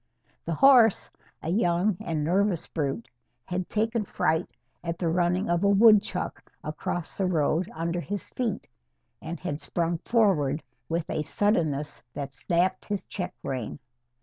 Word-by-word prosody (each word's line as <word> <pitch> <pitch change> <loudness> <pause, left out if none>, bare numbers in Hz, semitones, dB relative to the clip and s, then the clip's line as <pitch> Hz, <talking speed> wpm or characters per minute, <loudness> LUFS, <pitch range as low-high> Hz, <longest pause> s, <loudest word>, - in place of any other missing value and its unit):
The 165 - -1
horse 245 - +6 0.3
a 160 - -3
young 180 +1 +2
and 160 -3 -2
nervous 185 +2 +1
brute 135 -6 -3 0.4
had 180 0 -3
taken 225 +1 0
fright 160 -4 0 0.3
at 170 -1 -3
the 170 -2 0
running 175 +2 +1
of 175 +2 +1
a 200 - +4
woodchuck 205 -2 +3
across 155 +2 -4
the 190 - 0
road 165 0 +1
under 170 +2 -2
his 200 +3 -4
feet, 235 -5 -2 0.5
and 170 +2 -5
had 155 -4 -4
sprung 170 -1 -1
forward 165 - +2 0.3
with 165 0 -1
a - - -1
suddenness 155 -6 0
that 140 -1 -5
snapped 180 +6 0
his 205 -2 -3
check 180 -3 -5
rein. 125 -5 -3
175 Hz, 145 wpm, -27 LUFS, 160-200 Hz, 0.5 s, horse